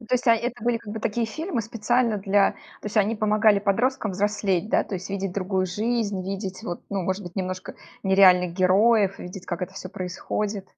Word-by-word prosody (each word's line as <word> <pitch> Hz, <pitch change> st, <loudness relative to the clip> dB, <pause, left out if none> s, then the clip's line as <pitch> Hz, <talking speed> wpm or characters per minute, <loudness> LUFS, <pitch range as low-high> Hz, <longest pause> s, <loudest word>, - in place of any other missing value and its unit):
Ну, 230 Hz, -, -14 dB
то 250 Hz, -, +2 dB
есть 245 Hz, -, -2 dB
о 230 Hz, -, +7 dB
это 240 Hz, +1 st, -4 dB
были 240 Hz, +1 st, +1 dB
как 220 Hz, -2 st, -9 dB
бы 220 Hz, -, -4 dB
такие 230 Hz, +2 st, -1 dB
фильмы, 315 Hz, -, -3 dB
специально 230 Hz, +1 st, 0 dB
для 195 Hz, 0 st, +3 dB
то -, -, -18 dB, 0.3 s
есть 210 Hz, +1 st, -2 dB
они 215 Hz, +2 st, +3 dB
помогали 215 Hz, -1 st, +3 dB
подросткам 220 Hz, +3 st, 0 dB
взрослеть, 200 Hz, -1 st, 0 dB
да? -, -, +3 dB
То 200 Hz, -, -5 dB
есть 185 Hz, +2 st, -7 dB
видеть 195 Hz, -1 st, -2 dB
другую 185 Hz, -1 st, -1 dB
жизнь, 210 Hz, 0 st, -1 dB
видеть, 190 Hz, +1 st, -5 dB
вот, 175 Hz, -6 st, -5 dB
ну, 200 Hz, -1 st, -1 dB
может 190 Hz, +3 st, -2 dB
быть, 175 Hz, -1 st, -10 dB
немножко 185 Hz, -1 st, -4 dB, 0.3 s
нереальных 185 Hz, -2 st, +5 dB
героев, 195 Hz, +2 st, +3 dB
видеть 180 Hz, +1 st, -8 dB
как 175 Hz, 0 st, -4 dB
это 180 Hz, +1 st, -4 dB
всё 190 Hz, -1 st, -7 dB
происходит. 195 Hz, +2 st, -4 dB
200 Hz, 205 wpm, -25 LUFS, 190-225 Hz, 0.3 s, о